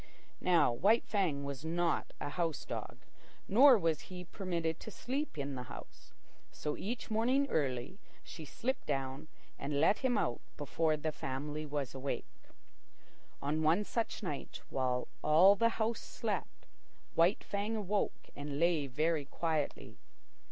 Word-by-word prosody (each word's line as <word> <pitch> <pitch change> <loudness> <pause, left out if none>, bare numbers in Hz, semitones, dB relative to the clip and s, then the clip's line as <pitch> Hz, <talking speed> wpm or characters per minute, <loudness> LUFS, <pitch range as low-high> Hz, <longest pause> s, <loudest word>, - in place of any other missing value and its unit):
Now 175 -8 +4
White 200 - +3
Fang 175 -9 0
was 140 0 -5
not 170 +1 0
a 145 - -3
house 165 -1 -1
dog, - - -5 0.5
nor 255 +5 +8
was 165 -5 +1
he 180 -1 -6
permitted 170 -3 -2
to - - -8
sleep 260 - -3
in 140 -1 -2
the 130 - -4
house; - - -11 0.4
so 150 -1 -3
each 225 +3 -4
morning, 255 +6 +3
early, 135 +4 -1 0.2
she 160 - -9
slipped 240 - -3
down 135 0 -2 0.3
and 140 0 -1
let 180 +7 +4
him 255 -3 +2
out 120 - 0 0.2
before 155 +2 +1
the 155 +1 -1
family 150 +2 -4
was 145 -3 -2
awake. 135 +1 -3 1.2
On 150 +3 0
one 165 +6 +4
such 225 +1 -2
night, 150 -7 -5
while 125 -1 0 0.2
all 175 +6 +7
the 230 +3 +4
house 225 +1 0
slept, - - -4 0.5
White 170 +5 +4
Fang 205 +2 -2
awoke 210 -1 -1
and 145 0 -4
lay 165 -4 +3
very 155 +2 +1
quietly. 155 +1 -2
160 Hz, 145 wpm, -34 LUFS, 145-200 Hz, 1.2 s, nor